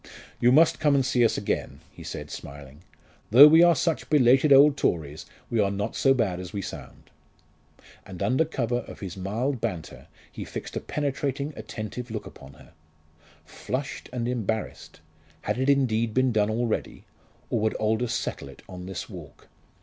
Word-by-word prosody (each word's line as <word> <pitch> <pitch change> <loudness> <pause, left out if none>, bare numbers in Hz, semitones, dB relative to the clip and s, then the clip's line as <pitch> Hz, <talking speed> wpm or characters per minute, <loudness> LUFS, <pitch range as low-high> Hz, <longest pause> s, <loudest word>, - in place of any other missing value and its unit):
"You 120 - +4
must 155 +5 +4
come 150 -2 +3
and 135 -2 +2
see 125 -1 +2
us 115 - +2
again," - - -3
he - - -14
said - - -7
smiling; 70 +1 -10 0.5
"though 130 +7 +10
we 160 +2 +6
are 175 -1 +6
such 165 +2 -1
belated 135 0 +4
old 140 +1 +7
Tories, 80 - -2 0.2
we 115 - +1
are 100 -2 +3
not 100 +2 -3
so 135 - +3
bad 100 -8 -1
as 90 -1 -7
we 100 - -4
sound." - - -9 0.9
And 95 0 -7
under 130 +10 +2
cover 120 -6 -2
of - - -11
his 95 -4 -6
mild 110 +7 -2
banter 90 -9 -5 0.2
he - - -7
fixed - - -8
a - - -1
penetrating 140 0 -3
attentive 120 +3 -7
look 110 -1 -5
upon 65 - -13
her. 70 - -18 0.7
Flushed 135 +2 -5
and 120 -2 -3
embarrassed! 110 -3 -4 0.4
Had - - -2
it 130 +2 +1
indeed 115 -5 +1
been 130 0 +3
done 105 -2 +1
already? 115 0 -2 0.5
or 115 - +1
would 110 0 0
Aldous 110 +2 0
settle 95 - -4
it 70 - -15
on 90 0 -9
this 95 - -6
walk? - - -12
115 Hz, 175 wpm, -26 LUFS, 100-135 Hz, 0.9 s, though